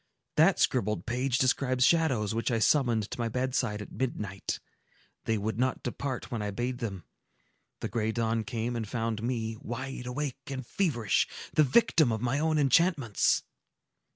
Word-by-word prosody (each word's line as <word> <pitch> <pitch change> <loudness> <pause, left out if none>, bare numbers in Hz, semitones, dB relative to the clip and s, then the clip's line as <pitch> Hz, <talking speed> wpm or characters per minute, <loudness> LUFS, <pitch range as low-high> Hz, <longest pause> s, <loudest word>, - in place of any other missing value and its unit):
That - - +5
scribbled 105 -4 +1
page 125 +1 0
describes 130 -1 +2
shadows 130 -12 +2
which 115 +1 -1
I 115 - +1
summoned 115 -3 +2
to - - -6
my 115 -1 0
bedside 125 -3 -1
at - - -13
midnight: 105 -7 -3 0.7
they 110 - +1
would 110 +3 -2
not 130 0 0
depart 130 +1 -4
when 115 -3 -2
I 105 - -2
bade 120 +4 -3
them; 95 -7 -4 0.8
the - - -1
gray 110 0 -1
dawn 115 0 0
came, 120 0 -3
and 110 -2 -3
found 115 -1 -2
me 115 -2 -2
wide 125 +1 -5
awake 135 +1 -3
and 135 -2 -5
feverish, 120 - +1 0.3
the - - +5
victim 150 - +4
of 110 - -1
my 125 +4 0
own 160 0 +2
enchantments!" 145 - +3
120 Hz, 160 wpm, -29 LUFS, 110-130 Hz, 0.8 s, That